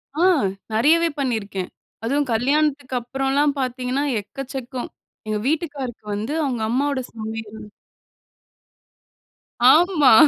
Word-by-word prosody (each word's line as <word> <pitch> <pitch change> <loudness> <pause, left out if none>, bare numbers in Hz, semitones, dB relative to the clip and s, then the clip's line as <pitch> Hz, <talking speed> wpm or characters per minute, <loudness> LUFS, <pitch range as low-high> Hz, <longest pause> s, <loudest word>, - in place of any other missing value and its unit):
ஆ. - - -3 0.5
நெறையவே 330 +9 +4
பண்ணியிருக்கேன். 210 -8 -2 0.3
அதுவும் 280 +4 +1
கல்யாணத்துக்கு 280 +2 +1
அப்புறம்லாம் 270 +4 +1
பாத்தீங்கன்னா 255 +2 -1 0.2
எக்கச்சக்கம். 260 +2 -6 0.4
எங்க 215 -1 -1
வீட்டுக்காருக்கு 285 -7 -2
வந்து 220 +8 -3
அவங்க 245 -4 -2
அம்மாவோட 275 +3 +1
சமையல் 220 -1 -6 2.1
ஆமா. 325 -6 +5
265 Hz, 90 wpm, -22 LUFS, 225-290 Hz, 2.1 s, ஆமா